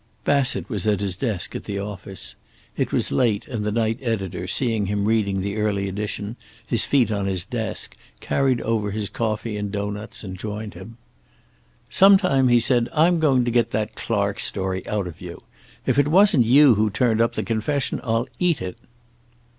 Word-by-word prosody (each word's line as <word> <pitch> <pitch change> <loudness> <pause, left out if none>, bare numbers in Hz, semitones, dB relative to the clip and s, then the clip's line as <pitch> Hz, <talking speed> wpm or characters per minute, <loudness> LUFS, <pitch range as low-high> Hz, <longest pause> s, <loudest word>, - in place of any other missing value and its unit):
Bassett 140 -3 +1
was 105 -5 -3
at 105 -1 +2
his 100 -3 -1
desk 105 -3 -2
in - - -4
the 100 -1 -5
office. 95 -9 -6 0.4
It - - -1
was - - +1
late, 115 -4 +1
and 120 -7 -4
the 105 - -1
night 115 +1 0
editor, 95 -7 -3
seeing 110 -1 0
him 100 0 -1
reading 105 -3 +1
the 100 +2 -3
early 100 -2 0
edition, 105 +3 -4 0.3
his 115 - +1
feet 125 -6 +3
on 100 -2 -1
his 95 -2 -2
desk, - - -4 0.2
carried 130 -3 +1
over 110 -2 -1
his 105 -1 -3
coffee 110 0 -2
and 105 -1 -3
doughnuts 105 +2 -4
and 95 -2 -6
joined 105 -1 -5
him. 95 +7 -11 0.9
"Sometime," 185 -9 +5
he 120 -1 +5
said, 120 0 +2
"I'm 165 +2 +4
going 135 -6 +3
to 120 - 0
get 120 0 +2
that 105 0 -1
Clark 100 -3 -1
story 95 -1 -2
out 105 -2 -1
of 85 -3 -9
you. - - -9 0.4
If 130 +1 +2
it 145 - +3
wasn't 165 - +5
you 135 +3 +7
who 110 0 +2
turned 115 +1 +1
up 115 0 +2
the - - -1
confession, 125 +5 -1
I'll 115 0 0
eat 175 -4 +2
it." 90 -1 -6
110 Hz, 185 wpm, -23 LUFS, 100-125 Hz, 0.9 s, you